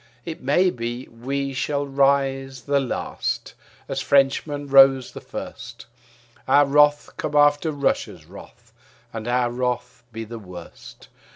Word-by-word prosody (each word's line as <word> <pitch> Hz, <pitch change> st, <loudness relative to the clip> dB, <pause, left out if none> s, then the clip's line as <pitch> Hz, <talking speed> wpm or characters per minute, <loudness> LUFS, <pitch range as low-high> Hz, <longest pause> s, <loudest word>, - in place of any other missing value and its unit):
It 165 Hz, -2 st, -7 dB
may 175 Hz, +8 st, +3 dB
be 120 Hz, 0 st, -5 dB
we 135 Hz, +4 st, -4 dB
shall 145 Hz, +2 st, -1 dB
rise 135 Hz, -1 st, 0 dB
the 140 Hz, 0 st, +1 dB
last 135 Hz, -3 st, -3 dB, 0.3 s
as -, -, -3 dB
Frenchmen 140 Hz, +1 st, +1 dB
rose 135 Hz, -2 st, +5 dB
the -, -, -9 dB
first, -, -, -9 dB, 0.6 s
Our 145 Hz, +2 st, +5 dB
wrath 145 Hz, +1 st, +3 dB
come 150 Hz, -, -4 dB
after 145 Hz, +2 st, +4 dB
Russia's 140 Hz, -2 st, -2 dB
wrath -, -, -15 dB, 0.4 s
and 115 Hz, 0 st, -6 dB
our 120 Hz, 0 st, +1 dB
wrath 125 Hz, 0 st, -3 dB
be 115 Hz, 0 st, -6 dB
the 115 Hz, +1 st, -8 dB
worst. 90 Hz, -4 st, -12 dB
135 Hz, 130 wpm, -23 LUFS, 125-145 Hz, 0.6 s, rose